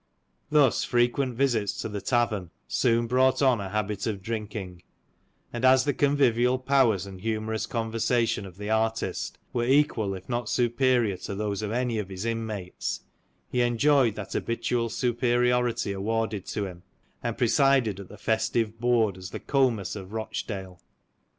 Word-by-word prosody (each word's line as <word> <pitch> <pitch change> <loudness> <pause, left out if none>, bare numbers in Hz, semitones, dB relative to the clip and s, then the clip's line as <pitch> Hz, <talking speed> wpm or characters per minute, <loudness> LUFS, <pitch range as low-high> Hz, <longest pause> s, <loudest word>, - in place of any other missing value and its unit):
Thus 150 -5 +4
fre 120 -1 +2
quent 125 0 -2
visits 115 -6 0
to - - -2
the 105 -2 -5
tavern, 110 -5 0 0.2
soon 115 -1 +2
brought 130 +2 +3
on 125 -5 +4
a 95 - -5
habit 105 0 -2
of 100 -4 -3
drinking; 105 -5 -5 0.7
and 120 +1 -4
as 130 0 +6
the 145 - +1
convivial 130 -3 +3
powers 130 -7 +2
and 95 -2 -10
humourous 110 0 -2
conversation 115 -2 0
of 90 -1 -14
the 105 0 -6
artist, 110 0 -1 0.2
were 120 - 0
equal 120 -7 +2
if 95 0 -10
not 120 -2 -2
superior 120 -4 +2
to 100 +2 -6
those 105 0 -2
of 105 -1 -3
any 120 -1 0
of 100 -2 -4
his 95 +2 -5
inmates, 110 -5 -3 0.5
he 125 - +1
enjoyed 120 0 +3
that - - -6
habitual 115 0 -1
superiority 120 -1 +1
awarded 110 0 -2
to 105 - -2
him, 90 -2 -9 0.4
and 115 -1 -3
presided 125 -4 +3
at 100 - -9
the - - -11
festive 110 0 0
board 115 -5 +2
as 90 0 -7
the - - -6
Comus 125 -10 +1
of 95 -3 -8
Eochdale. 100 -4 -5
115 Hz, 155 wpm, -27 LUFS, 105-125 Hz, 0.7 s, as